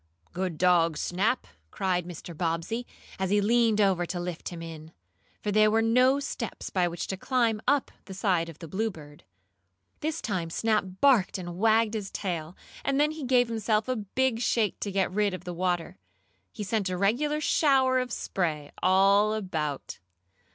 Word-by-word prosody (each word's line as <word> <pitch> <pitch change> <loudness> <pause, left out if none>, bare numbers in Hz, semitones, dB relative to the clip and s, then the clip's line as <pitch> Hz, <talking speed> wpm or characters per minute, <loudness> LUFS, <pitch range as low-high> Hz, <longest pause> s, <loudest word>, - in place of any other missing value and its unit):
"Good 180 -2 -3
dog, 170 -3 +3
Snap!" 200 +11 0 0.2
cried 180 - -1
Mr. 175 -1 -8
Bobbsey, 170 +9 -2 0.3
as 190 -1 0
he 205 +1 +3
leaned 225 +1 +3
over 190 -4 +2
to 180 - -3
lift 175 -2 -5
him 175 - -8
in, 160 -1 -9 0.5
for 210 - -1
there 215 +1 +5
were 225 +1 +2
no 255 +4 +4
steps 240 -5 -5
by 180 -2 +2
which 170 0 -4
to 190 - -4
climb 230 -1 +1
up 280 0 +2
the 190 - -9
side 180 -4 +1
of 160 - -11
the 165 - -9
Bluebird. 160 -7 -5 0.8
This 315 +1 -2
time 185 -6 -2
Snap 215 +3 +1 0.2
barked 250 -11 +4
and 175 -1 -7
wagged 220 0 +3
his 205 -3 -3
tail, 170 -3 -4 0.3
and 275 0 +1
then 300 +1 +3
he 310 -1 -7
gave 250 -1 +3
himself 220 -1 0
a 255 - 0
big 230 +3 0
shake 230 -3 +1
to 200 - -3
get 190 -1 0
rid 205 -1 +1
of 180 - -10
the 180 -1 -5
water. 175 -1 -2 0.5
He 215 - -6
sent 200 -1 -1
a 180 - -2
regular 260 +11 +1
shower 265 -4 +3
of 250 -1 -3
spray 155 -9 -2
all 195 +3 +4
about. 160 -9 -4
200 Hz, 175 wpm, -28 LUFS, 175-230 Hz, 0.8 s, there